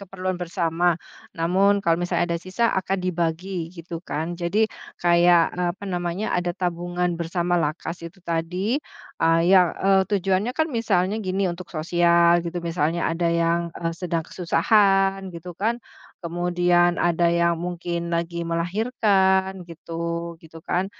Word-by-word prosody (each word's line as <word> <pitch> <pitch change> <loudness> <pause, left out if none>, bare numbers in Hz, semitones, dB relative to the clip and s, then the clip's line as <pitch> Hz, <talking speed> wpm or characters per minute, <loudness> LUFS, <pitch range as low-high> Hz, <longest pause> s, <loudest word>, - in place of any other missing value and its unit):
keperluan 185 -1 -4
bersama, 175 -1 0 0.3
namun 190 +5 +2
kalau 165 -3 +2
misalnya 175 0 0
ada 170 - 0
sisa, 185 +7 -1
akan 190 0 -1
dibagi, 175 0 -2
gitu 170 0 -8
kan. 165 +3 -3
Jadi, 190 +6 +1 0.3
kayak 175 -1 +5
apa 180 +2 -2
namanya, 175 +3 -2
ada 175 0 -1
tabungan 175 0 -2
bersama 175 +1 -1
LAKAS 165 +1 -3
itu 170 +3 -10
tadi, 180 +7 -1 0.4
eee, 165 0 +3
ya 185 -3 +5
eee, 195 0 +3
tujuannya 195 +4 +1
kan 315 +4 0
misalnya 210 - 0
gini, 190 +1 0
untuk 175 +1 -7
sosial, 170 +1 +3
gitu, 170 +1 -4
misalnya 170 -1 0
ada 170 0 0
yang, 170 0 0
eee, 165 0 -2
sedang 170 -2 -3
kesusahan 195 0 +2
gitu 170 0 -9
kan, 230 +5 -1 0.4
kemudian 175 0 +1
ada 170 0 +2
yang 170 0 +2
mungkin 170 0 -4
lagi 170 0 -2
melahirkan 190 +1 +1
gitu 170 0 -5
gitu 160 0 -14
kan. 180 +3 -1
175 Hz, 135 wpm, -23 LUFS, 170-190 Hz, 0.4 s, kayak